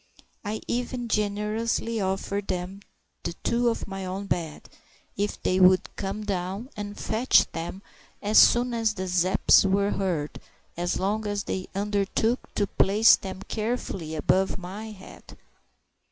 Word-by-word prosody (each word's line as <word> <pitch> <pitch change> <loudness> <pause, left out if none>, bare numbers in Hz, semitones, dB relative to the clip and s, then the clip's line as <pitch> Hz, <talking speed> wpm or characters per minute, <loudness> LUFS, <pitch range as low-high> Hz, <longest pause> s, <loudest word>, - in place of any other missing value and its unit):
I 215 +1 -3
even 245 0 -2
generously 215 +2 -1
offered 195 +1 -2
them 185 +2 -3 0.4
the - - -4
two 240 0 +2
off 230 - -3
my 195 -1 -6
own 190 +2 -4
bed, 165 -5 -3 0.5
if 205 +1 -2
they 185 - +2
would 185 0 +4
come 200 +2 -4
down 195 +4 -3
and 205 0 -6
fetch 230 +4 +3
them 180 +4 -6 0.4
as 210 +1 +4
soon 245 0 +5
as 225 -2 0
the 185 -1 -3
Zepps 185 +2 +4
were 200 +1 +2
heard, 170 -7 -2 0.4
so 175 - -1
long 210 +3 -1
as 205 -1 -2
they 185 -1 -4
undertook 205 +4 0
to 205 - +2
place 205 +3 +5
them 190 0 -7
carefully 210 -8 -3
above 190 +5 +1
my 195 +4 -7
head. 200 -3 -13
200 Hz, 140 wpm, -26 LUFS, 190-215 Hz, 0.5 s, soon